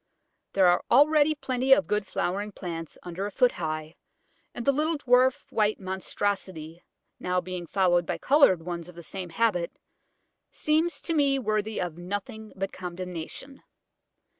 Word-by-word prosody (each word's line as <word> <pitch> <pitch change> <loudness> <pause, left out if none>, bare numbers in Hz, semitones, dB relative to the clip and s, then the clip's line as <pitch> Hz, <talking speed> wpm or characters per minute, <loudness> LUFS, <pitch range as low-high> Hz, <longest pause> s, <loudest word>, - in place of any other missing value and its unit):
There 195 -1 +4
are 175 0 +4
already 300 +3 +5
plenty 260 -2 +2
of 285 +2 +3
good 210 -1 -1
flowering 200 +4 -2
plants 165 -4 -6
under 180 +3 -4
a - - -7
foot 245 +5 +3
high, 155 -1 -4 0.6
and 240 - -6
the 275 - +5
little 310 +3 0
dwarf 255 -1 +3
white 215 -1 +1
monstrosity, 190 -3 -3 0.4
now 180 0 0
being 180 -1 -5
followed 175 -3 +2
by - - -1
coloured 265 - +4
ones 170 0 -5
of 180 - -13
the 170 - -10
same 185 +1 -6
habit, 180 -2 0 0.8
seems 310 -1 0
to 335 - -1
me 280 -3 +3
worthy 215 -3 -1
of 175 -2 -4
nothing 210 +4 -5
but 195 0 -3
condemnation. 180 - -7
195 Hz, 150 wpm, -27 LUFS, 175-255 Hz, 0.8 s, already